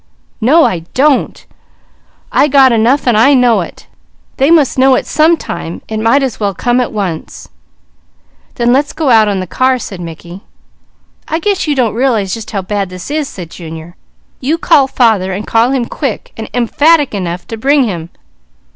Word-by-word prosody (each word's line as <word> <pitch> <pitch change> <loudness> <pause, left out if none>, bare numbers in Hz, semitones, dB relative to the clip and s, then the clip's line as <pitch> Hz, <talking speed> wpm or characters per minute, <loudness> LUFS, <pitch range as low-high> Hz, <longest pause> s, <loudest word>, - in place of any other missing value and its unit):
"No 300 +9 +4
I 180 - 0 0.2
don't! 280 +1 +1 0.9
I - - +3
got 270 -2 +5
enough 235 +5 +2
and 245 -3 +2
I 270 +6 +5
know 245 -3 +3
it! - - -9 0.5
They 270 +3 +2
must 305 -6 +3
know 265 0 +5
it - - -1
some 315 +3 +2
time; 170 - -7
it 220 -1 -4
might 230 +6 +2
as 260 -4 -3
well 200 -3 -1
come 245 +4 +1
at 245 - -3
once." 190 -7 -5 1.1
"Then 240 0 +1
let's 280 +2 0
go 300 -5 0
out 220 -2 +5
on 200 -2 -1
the - - -4
car," 255 +8 +1
said 195 -6 -8
Mickey. 170 +2 -9 0.9
"I 320 - -1
guess 385 +1 -1
you 295 - 0
don't 245 -5 +1
realize 225 -6 0
just 225 -1 -6
how 200 -3 -3
bad 200 0 -3
this 185 +8 -8
is," 300 -2 -2
said 175 -4 -9
Junior. 165 0 -10 0.4
"You 295 +6 -1
call 280 -4 +3
father, 220 -8 +1
and 200 +3 -5
call 230 +2 +2
him 260 -3 0
quick 265 -2 -5
and 220 - -7
emphatic 290 +5 +2
enough 180 -3 -4
to 225 - -4
bring 275 +5 +2
him." 170 -7 -4
235 Hz, 180 wpm, -13 LUFS, 195-275 Hz, 1.1 s, got